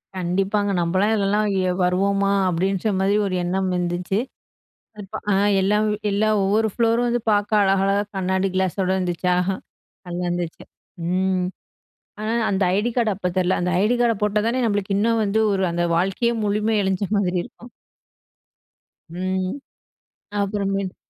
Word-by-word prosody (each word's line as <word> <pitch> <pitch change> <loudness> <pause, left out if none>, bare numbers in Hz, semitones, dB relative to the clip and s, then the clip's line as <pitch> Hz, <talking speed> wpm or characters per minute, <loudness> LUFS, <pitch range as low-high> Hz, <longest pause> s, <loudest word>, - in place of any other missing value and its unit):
கண்டிப்பாங்க, 195 +3 0
நம்பளா 185 +4 +1
இதுலெல்லாம் 205 +1 +1 0.4
வருவோமா 195 +2 +1 0.2
அப்படின்ற 190 +4 0
மாரி 195 +2 +2
ஒரு 190 -2 -2
எண்ணம் 190 +2 -1
இருந்துச்சு.இப்ப 180 +7 -2 1.3
எல்லா 205 +2 +2 0.3
எல்லா 210 +2 +1
ஒவ்வொரு 215 +3 +2
ப்ளோரும் 235 +1 +2
வந்து 240 -1 0
பார்க்க 210 +1 +2
அழகழகாக 195 +1 +2
கண்ணாடி 190 +1 0
கிளாஸோடு 190 0 0
இருந்துச்சா, 180 0 0 0.7
நல்லா 175 0 -4
இருந்துச்சு. 175 -1 -4 0.5
ம், 185 0 +1 0.7
ஆனா 215 +1 -2 0.2
அந்த 195 0 +1
ஐடி 220 +4 +1
கார்டு 230 -3 +2
அப்ப 180 -2 -2
தரல, 185 0 +2
அந்த 180 0 0
ஐடி 220 +4 +2
கார்டை 235 -2 +3
போட்டா 210 0 +1
தானே 250 +2 0
நம்மளுக்கு 200 -2 -1
இன்னு 225 +3 +2
வந்து, 210 +2 +1
ஒரு 190 -1 +1
அந்த 175 0 -1
வாழ்க்கையே 195 +7 +1
முழுமை 210 +1 +1
அடைஞ்ச 190 +1 0
மாதிரி 180 -2 0
இருக்கும். 240 +1 -14 1.4
ம். 185 0 -2 0.9
அப்புறமேட்டு. 195 -1 -2
195 Hz, 130 wpm, -22 LUFS, 185-210 Hz, 1.4 s, கார்டை